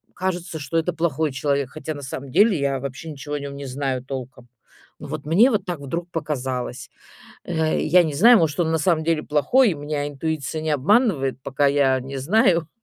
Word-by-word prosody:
кажется, 180 -3 -3
что 145 +3 -3
это 165 +1 0
плохой 160 -3 -1
человек. 140 0 -1
Хотя 155 +1 -6
на 145 - -8
самом 135 0 -7
деле 205 +2 +4
я 135 -1 0
вообще 140 +4 -6
ничего 145 +1 -6
о 145 - -2
нём 140 0 -6
не 140 0 -7
знаю 130 -1 -3
толком. 130 -2 -8 0.5
Но - - -8
вот 145 0 -6
мне 205 - +5
вот 205 -3 0
так 175 -5 -4
вдруг 170 +5 -4
показалось. 130 -5 -4 0.6
Э, 160 -2 0
я 180 +1 +5
не 155 -3 -2
знаю, 230 +10 +7
может, 160 -1 0
он 160 -2 +1
на 160 - +1
самом 160 0 +1
деле 165 -2 +1
плохой, 175 - +3
и - - -2
меня 145 0 -3
интуиция 155 +1 -3
не 155 - -2
обманывает, 150 - +2
пока 140 +2 0
я 140 -2 +3
не 135 +1 -6
знаю, 170 +1 +2
150 Hz, 200 wpm, -22 LUFS, 140-170 Hz, 0.6 s, знаю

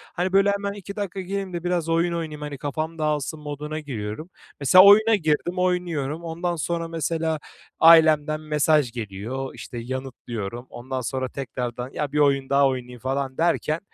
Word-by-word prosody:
hani, 185 +1 -1
böyle 195 +1 +5
hemen 200 0 -2
2 200 0 -9
dakika 195 -2 -4
gireyim 195 0 -4
de 170 - -4
biraz 175 -2 -1
oyun 170 +1 +2
oynayayım 155 -3 -4
hani 145 -1 -5
kafam 155 +4 -4
dağılsın 150 0 -1
moduna 150 +1 -5
giriyorum. 130 - -6 0.3
Mesela 165 +7 +7
oyuna 215 +2 +7
girdim, 170 0 0
oynuyorum. 170 -4 -1
Ondan 170 +1 -2
sonra 165 +1 -2
mesela 160 0 -1 0.4
ailemden 155 -2 +6
mesaj 150 -3 +2
geliyor, 115 +4 -5
işte, 120 - -8
yanıtlıyorum. 120 -2 -6
Ondan 130 +2 -5
sonra 130 +1 -3
tekrardan 125 -2 -5
ya 145 -2 -3
bir 150 - 0
oyun 140 -2 +2
daha 140 0 +4
oynayayım 125 -2 -4
falan 135 +1 -3
derken 165 -1 +1
155 Hz, 160 wpm, -24 LUFS, 135-170 Hz, 0.4 s, Mesela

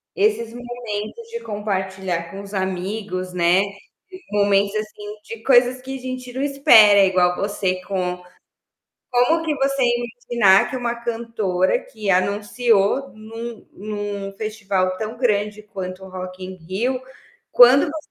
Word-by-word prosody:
Esses 405 - +1
momentos 240 - -6
de 465 - -4
compartilhar 190 -4 -3
com 195 - -7
os 200 +1 -11
amigos, 190 0 -3
né, 175 +1 +3 0.7
momentos, 200 0 +2
assim, 215 -1 -5
de 225 +1 -9
coisas 255 0 +4
que 265 +1 -6
a - - -13
gente 255 -1 -6
não 260 - -3
espera 240 -8 +6
igual 180 -1 +2
você 195 -2 -2
com 180 -2 -3 0.9
como 255 +7 +3
que 310 -2 0
você 275 0 0
ia 240 -1 +2
me 240 - -3
ensinar 230 -5 +4
que - - -3
uma 240 -1 -2
cantora 225 -6 -1
que 215 -2 -8
anunciou 205 +5 +1
num 225 +1 -9
num 205 -1 -5
festival 195 -4 -1
tão 220 +3 -5
grande 210 -3 0
quanto 190 -2 -7
o - - -10
Rock 185 0 -7
in 185 0 -7
Rio, 210 +10 -2 0.5
quando 250 +3 +7
você 310 0 -8
210 Hz, 145 wpm, -21 LUFS, 190-245 Hz, 0.9 s, quando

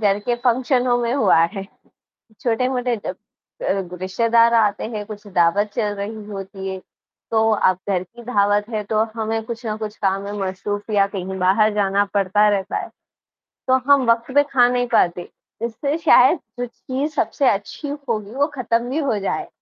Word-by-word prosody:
घर 200 -2 +2
के 240 +4 -1
फंक्शनों 250 0 +2
में 235 0 0
हुआ 215 -11 +4 0.2
है। 195 -3 -5 0.8
छोटे-मोटे 250 +1 0
जो 205 - -5
अ, 185 -1 -6
रिश्तेदार 230 +4 +3
आते 215 -3 +2
हैं, 215 -2 -5
कुछ 210 0 -10
दावत 200 +3 +2
चल 210 -3 0
रही 205 +1 -6
होती 195 -1 -7
है, 190 0 -5 0.5
तो 220 0 +3
अब 185 -3 +2
घर 185 -2 +1
की 235 +6 -15
दावत 205 -2 +1
है, 215 -2 -2
तो 215 +1 +1
हमें 225 0 -2
कुछ 235 +1 -7
ना 215 -1 -2
कुछ 215 -1 -6
काम 195 -1 0
में 200 - -5 0.2
मशरूफ़ 205 +3 -4
या 200 -1 +3
कहीं 190 0 -4
बाहर 200 +4 +3
जाना 200 -1 +2
पड़ता 205 +1 +3
रहता 195 -2 -1
है। - - -5 0.8
तो 260 - +5
हम 275 -2 +5
वक़्त 230 +3 -1
पे 285 - +6
ख़ा 245 -3 +5
नहीं 245 0 0
पाते, 175 0 +2 0.4
इससे 260 +6 -2
शायद 330 - +5 0.2
जो 245 - -1
चीज़ 260 +4 -4
सबसे 275 -5 +2
अच्छी 205 +9 -3 0.2
होगी 215 -2 -2
वो 285 +1 +2
ख़त्म 235 -1 0
भी 270 - -2
हो 280 -8 0
जाए। 195 - -2
215 Hz, 175 wpm, -21 LUFS, 200-240 Hz, 0.8 s, पे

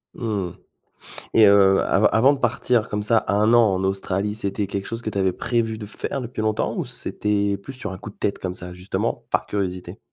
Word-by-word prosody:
Mmh, 100 -7 -3 0.8
et 110 -2 +7
heu, 95 -1 +6
av 100 +3 +3
avant 130 +6 +5
de 135 - -5
partir 120 -1 +1
comme 105 0 -2
ça, 110 +2 +2
1 105 +3 +3
an 110 -5 +5
en 95 +1 -1
Australie, 95 +2 -1
c'était 100 -1 -2
quelque 100 0 -4
chose 115 0 -5
que 110 - -3
tu 100 - -5
avais 95 -2 +2
prévu 115 -2 -1
de 105 - -7
faire 130 - -4
depuis 120 -2 -5
longtemps 110 0 -1
ou - - -1
c'était 100 -1 -1
plus 130 +7 -10
sur 105 -7 -6
un 95 - -6
coup 105 - -9
de - - -26
tête, 100 - -1
comme 90 -1 -4
ça, 90 -1 -7
justement, 90 +2 -3
par - - 0
curiosité? 90 -1 -4
105 Hz, 220 wpm, -23 LUFS, 95-110 Hz, 0.8 s, et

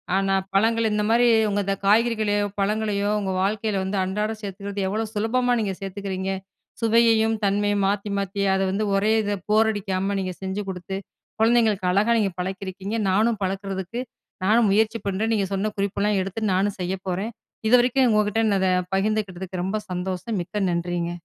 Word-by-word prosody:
ஆனா, 195 0 +1 0.2
பழங்கள் 225 +3 +3
இந்தமாரி 220 +3 +2 0.2
உங்க 205 0 0
இந்த 195 0 0
காய்கறிகளையோ! 215 -1 +3
பழங்களையோ! 205 0 0
உங்க 190 -2 -2
வாழ்க்கையில 205 0 0
வந்து 190 +1 -2
அன்றாடம் 210 +3 -2
சேர்த்துக்கிறது 200 0 -4
எவ்ளோ 215 +3 -1
சுலபமான 245 +4 +1
நீங்க 195 -2 -1
சேர்த்துக்கிறீங்க! 195 -1 -4 0.5
சுவையையும் 225 -1 +4
தன்மையும் 205 0 +1
மாத்தி, 205 +1 -1
மாத்தி 200 0 -2
அத 190 - 0
வந்து 210 +2 -1
ஒரே 210 +2 +2
இத 205 0 -1
போர் 220 +1 +4
அடிக்காம 195 -1 -2
நீங்க 185 -1 -3
செஞ்சு 190 +2 -3
குடுத்து, 190 +1 -5 0.4
குழந்தைங்களுக்கு 220 -5 +3
அழகாக 215 +5 +3
நீங்க 195 -3 +1
பழக்கியிருக்கீங்க. 190 +2 -4
நானும் 220 +3 +2
பழக்கிறதுக்கு 195 +3 -3 0.4
நானும் 220 0 +4
முயற்சி 220 +2 +2
பண்றேன். 210 +4 0
நீங்க 195 -2 0
சொன்ன 205 +2 -1
குறிப்பெல்லாம் 200 0 0
எடுத்து 195 +4 -4
நானும் 200 +2 0
செய்ய 180 +1 -2
போறேன். 195 +6 -2 0.4
இதுவரைக்கும் 250 +1 +4
உங்ககிட்ட 210 +1 +2
இன்னத 195 -2 +2 0.3
பகிர்ந்துக்கிட்டதுக்கு 190 -3 -2
ரொம்ப 215 +3 -1
சந்தோஷம். 185 +4 -3
மிக்க 195 +2 -2
நன்றிங்க! 170 0 -2
205 Hz, 150 wpm, -24 LUFS, 190-220 Hz, 0.5 s, சுவையையும்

